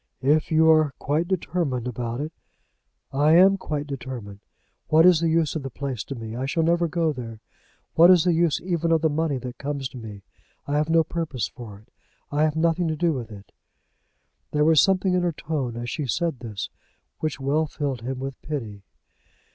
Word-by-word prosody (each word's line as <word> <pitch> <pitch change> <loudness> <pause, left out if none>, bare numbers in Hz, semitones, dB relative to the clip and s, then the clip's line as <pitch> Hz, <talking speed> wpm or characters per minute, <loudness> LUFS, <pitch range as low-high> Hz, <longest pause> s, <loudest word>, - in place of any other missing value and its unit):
"If 150 +4 +2
you 160 0 +5
are 155 -3 +3
quite 155 +5 -1
determined 165 -9 -1
about 120 +1 -4
it 155 +2 -5 0.5
" - - -50 0.2
"I 145 +3 +3
am 190 +3 +7
quite 150 -6 -4
determined. 125 -8 -7 0.5
What 160 +2 +5
is 180 -3 +6
the 165 0 +1
use 160 -1 +1
of 155 - -2
the 135 - -5
place 130 -5 -4
to 135 - -6
me? 115 -2 -7
I - - -5 0.2
never 170 +1 +3
shall - - 0
go 165 -1 0
there. 115 -4 -8 0.5
What 170 +2 +7
is 180 -3 +6
the 180 - +3
use 165 -2 +2
even 170 -2 -1
of 165 -1 +3
the 160 - +3
money 155 -2 0
that 125 -1 -7
comes 140 -1 -3
to 130 - -10
me? 105 -3 -9 0.4
I 145 - -2
have 150 +1 +1
no 165 0 +4
purpose 160 -6 -3
for 110 -5 -10
it. 105 - -21 0.4
I 145 +1 0
have 155 0 -1
nothing 165 +2 +1
to 160 - -1
do 165 +1 +1
with 120 -5 -6
it." 100 -1 -12 1.0
There 150 0 +1
was 160 -1 +6
something 190 -1 +2
in 180 - +2
her 175 -1 +1
tone 140 -7 -3
as 120 0 -5
she 140 +4 -3
said 155 +4 -1
this 110 -5 -6 0.5
which 155 -2 -3
well 145 +4 +1
filled 140 -5 -3
him 130 +2 -4
with 135 +1 -6
pity. 115 -9 -5
150 Hz, 205 wpm, -24 LUFS, 125-165 Hz, 1.0 s, am